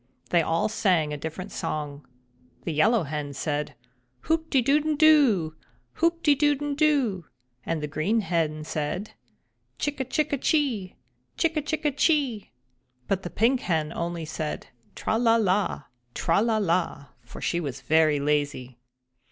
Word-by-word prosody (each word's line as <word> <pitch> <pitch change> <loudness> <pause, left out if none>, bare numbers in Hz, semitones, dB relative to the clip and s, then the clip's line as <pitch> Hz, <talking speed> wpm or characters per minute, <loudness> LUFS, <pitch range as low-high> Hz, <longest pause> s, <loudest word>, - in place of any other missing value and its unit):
They 170 - +5
all 165 +1 +1
sang 185 -9 +1
a - - -2
different 160 +6 -6
song. 145 -2 -4 0.6
The 165 - -3
Yellow 210 +7 +3
Hen 145 -1 -4
said: 150 +1 -3 0.5
"Hoop 320 0 -1
de 270 - +3
dooden 295 +5 +2
do! 265 - +4 0.5
Hoop 335 0 +2
de 295 - +6
dooden 290 0 +1
doo!" 275 - +1 0.4
and 165 -2 -1
the - - -1
Green 185 +10 0
Hen 160 -5 -1
said: 155 +7 -3 0.7
"Chick 290 -1 -2
a - - +1
chick 295 +3 0
chee! 245 - 0 0.4
Chick 330 -1 +1
a 305 - +1
chick 305 -1 -2
chee!" 275 - +1 0.6
But 195 -1 0
the 175 - -6
Pink 240 +7 +2
Hen 160 -5 -1
only 170 -1 -3
said 155 -2 -5 0.3
"Tra 220 - -1
la 230 -1 +4
la! 200 -6 +1 0.3
Tra 165 +4 +2
la 225 -1 +2
la!" 175 -7 0 0.2
for 120 - -11
she 170 - -1
was 145 -6 -5
very 155 -2 +3
lazy. 140 -4 -1
190 Hz, 150 wpm, -26 LUFS, -, 0.7 s, de